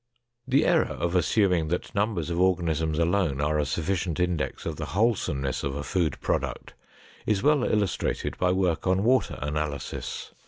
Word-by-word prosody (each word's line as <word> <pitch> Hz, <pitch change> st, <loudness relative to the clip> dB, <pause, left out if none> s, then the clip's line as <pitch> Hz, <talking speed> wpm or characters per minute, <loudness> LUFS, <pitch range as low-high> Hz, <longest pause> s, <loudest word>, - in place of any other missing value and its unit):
The 130 Hz, +2 st, +3 dB
error -, -, +4 dB
of 85 Hz, 0 st, -2 dB
assuming 90 Hz, -3 st, +2 dB
that 90 Hz, +3 st, -3 dB
numbers 100 Hz, -6 st, -1 dB
of 85 Hz, -, -1 dB
organisms 80 Hz, -4 st, +1 dB
alone 85 Hz, -4 st, +1 dB
are 75 Hz, +1 st, +1 dB
a 75 Hz, -, 0 dB
sufficient 85 Hz, +3 st, -1 dB
index 90 Hz, -3 st, -1 dB
of -, -, -3 dB
the -, -, -4 dB
wholesomeness 80 Hz, -, 0 dB
of 70 Hz, 0 st, -2 dB
a 70 Hz, -, -4 dB
food 85 Hz, -2 st, -1 dB
product -, -, -2 dB, 0.5 s
is 105 Hz, -3 st, +1 dB
well 150 Hz, -3 st, +4 dB
illustrated 105 Hz, -5 st, -1 dB
by 90 Hz, 0 st, +3 dB
work 90 Hz, -3 st, 0 dB
on 95 Hz, +1 st, +2 dB
water 130 Hz, +3 st, +2 dB
analysis. 75 Hz, -1 st, -4 dB
90 Hz, 160 wpm, -26 LUFS, 75-95 Hz, 0.5 s, error